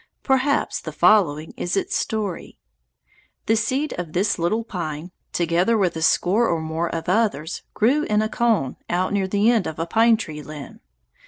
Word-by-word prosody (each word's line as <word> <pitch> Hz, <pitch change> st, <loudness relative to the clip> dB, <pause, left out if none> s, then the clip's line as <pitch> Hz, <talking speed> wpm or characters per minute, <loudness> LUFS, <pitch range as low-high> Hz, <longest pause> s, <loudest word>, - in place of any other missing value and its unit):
Perhaps 270 Hz, +1 st, +1 dB
the -, -, -6 dB
following 160 Hz, -8 st, +3 dB
is 175 Hz, +3 st, -2 dB
its -, -, -1 dB
story: 210 Hz, -6 st, -3 dB, 0.9 s
The 225 Hz, -, +3 dB
seed 260 Hz, +7 st, -1 dB
of 170 Hz, -3 st, -5 dB
this 195 Hz, +1 st, +1 dB
little 215 Hz, +7 st, 0 dB
pine, 170 Hz, -5 st, -5 dB, 0.2 s
together 175 Hz, +6 st, +1 dB
with 185 Hz, -5 st, +1 dB
a 160 Hz, -, -4 dB
score 195 Hz, +7 st, +3 dB
or 165 Hz, -, 0 dB
more 160 Hz, +2 st, -2 dB
of 165 Hz, -, -5 dB
others, 185 Hz, -5 st, 0 dB
grew 255 Hz, +8 st, +3 dB
in 210 Hz, 0 st, +1 dB
a -, -, 0 dB
cone 220 Hz, -, 0 dB
out 180 Hz, +3 st, 0 dB
near 195 Hz, -2 st, +1 dB
the 205 Hz, +4 st, +3 dB
end 225 Hz, -5 st, +1 dB
of 160 Hz, -, -5 dB
the 165 Hz, -, -3 dB
pine 225 Hz, +5 st, +4 dB
tree 155 Hz, -8 st, -6 dB
limb. 150 Hz, -1 st, -10 dB
190 Hz, 175 wpm, -22 LUFS, 165-220 Hz, 0.9 s, pine